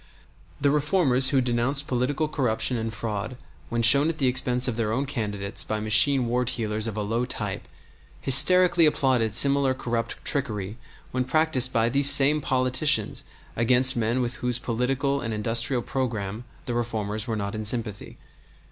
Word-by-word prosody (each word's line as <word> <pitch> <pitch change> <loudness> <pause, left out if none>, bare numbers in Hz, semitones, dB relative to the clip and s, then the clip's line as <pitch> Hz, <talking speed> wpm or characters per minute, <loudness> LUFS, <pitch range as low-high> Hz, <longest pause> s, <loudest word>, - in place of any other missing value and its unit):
The 140 0 +1
reformers 145 -4 +1
who 135 -2 +1
denounced 125 +3 -1
political 135 +5 -2
corruption 125 -4 -1
and 115 -1 -4
fraud 110 +1 -6 0.3
when 115 0 -2
shown 140 +7 +6
at 165 - -4
the 135 - -1
expense 125 0 +1
of 125 - -2
their 110 -2 -2
own 130 +5 -2
candidates 105 -6 -4
by 110 - -4
machine 115 +5 +2
ward 125 +1 -2
heelers 110 -2 -3
of 110 -1 -6
a 105 - -2
low 115 +4 -2
type - - -5 0.5
hysterically 170 +5 +5
applauded 125 -7 0
similar 140 +1 +3
corrupt 120 -3 -4
trickery 110 -7 -3 0.3
when 130 0 -2
practiced 135 -2 +1
by 115 0 0
these 140 +3 +6
same 145 +2 +6
politicians 130 -2 0 0.3
against 125 +3 +4
men 120 +2 -1
with 120 0 -4
whose 125 -1 -1
political 130 +4 -2
and 115 -2 -4
industrial 115 +3 -1
programme 115 -4 -4 0.2
the 120 - -4
reformers 110 -2 -4
were 115 - -3
not 100 0 -5
in 110 0 -5
sympathy. 105 -1 -4
125 Hz, 160 wpm, -24 LUFS, 110-135 Hz, 0.5 s, shown